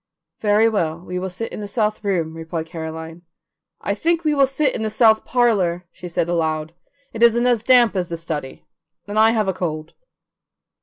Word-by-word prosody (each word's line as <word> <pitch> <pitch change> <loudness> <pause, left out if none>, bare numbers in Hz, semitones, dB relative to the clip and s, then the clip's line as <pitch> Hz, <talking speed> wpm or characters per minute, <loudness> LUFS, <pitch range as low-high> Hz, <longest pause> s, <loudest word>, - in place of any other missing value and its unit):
"Very 210 +1 +3
well, 165 -8 0
we 180 +1 -5
will 190 +1 -3
sit 205 +6 -6
in - - -6
the 205 - -5
south 215 +1 -1
room," 170 -6 -1
replied 165 0 -5
Caroline. 160 0 -7 0.6
"I 200 - -1
think 335 +9 0
we 305 -1 +2
will 275 -2 +4
sit 270 +1 0
in - - -4
the 220 - -1
south 220 0 +4
parlour," 195 -8 +1
she 180 - -9
said 170 -1 -1
aloud; 160 -2 -1 0.4
"it 225 - -6
isn't 235 +1 +5
as 240 -3 +3
damp 240 -2 +4
as 180 -2 -1
the 170 - -4
study, 155 -5 -6 0.4
and 205 +1 -1
I 220 +1 +6
have 220 -3 +1
a 190 - +1
cold." 155 -3 -4
200 Hz, 195 wpm, -21 LUFS, 165-225 Hz, 0.6 s, I